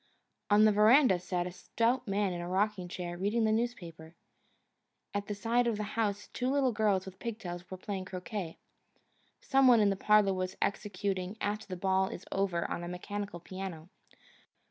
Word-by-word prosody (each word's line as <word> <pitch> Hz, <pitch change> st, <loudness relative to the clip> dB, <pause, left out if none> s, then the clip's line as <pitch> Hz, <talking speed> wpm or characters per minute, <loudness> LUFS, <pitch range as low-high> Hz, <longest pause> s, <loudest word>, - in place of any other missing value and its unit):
On 210 Hz, +1 st, +6 dB
the 215 Hz, -, +6 dB
veranda 215 Hz, 0 st, +5 dB
sat 180 Hz, 0 st, -2 dB
a 180 Hz, -, -4 dB
stout 230 Hz, +7 st, -1 dB
man 200 Hz, -1 st, 0 dB
in 175 Hz, -, -4 dB
a 175 Hz, -, -5 dB
rocking 195 Hz, 0 st, 0 dB
chair, 175 Hz, -1 st, -5 dB
reading 210 Hz, +4 st, +1 dB
the 220 Hz, -, +3 dB
newspaper. 175 Hz, -9 st, -3 dB, 1.0 s
At 205 Hz, 0 st, -2 dB
the 210 Hz, -, -3 dB
side 235 Hz, +4 st, +1 dB
of 230 Hz, -3 st, 0 dB
the 210 Hz, -, -2 dB
house 205 Hz, -3 st, -1 dB
two 250 Hz, +1 st, -1 dB
little 270 Hz, -2 st, +2 dB
girls 210 Hz, -4 st, +1 dB
with 190 Hz, 0 st, -10 dB
pig 230 Hz, -2 st, -4 dB
tails 175 Hz, -3 st, -7 dB
were 185 Hz, -, -6 dB
playing 190 Hz, 0 st, -5 dB
croquet. 185 Hz, -2 st, -5 dB, 0.8 s
Some 270 Hz, -1 st, +4 dB
one 240 Hz, -2 st, +7 dB
in 205 Hz, -1 st, +4 dB
the -, -, 0 dB
parlour 210 Hz, 0 st, +4 dB
was 185 Hz, 0 st, -3 dB
executing 200 Hz, -1 st, -2 dB
"After 210 Hz, +1 st, -2 dB
the 185 Hz, -2 st, -5 dB
Ball 190 Hz, +1 st, +2 dB
is 190 Hz, -, -8 dB
Over" 190 Hz, -3 st, 0 dB
on 175 Hz, -, -4 dB
a -, -, -5 dB
mechanical 200 Hz, +1 st, -5 dB
piano. 185 Hz, -2 st, -7 dB
200 Hz, 185 wpm, -31 LUFS, 185-215 Hz, 1.0 s, one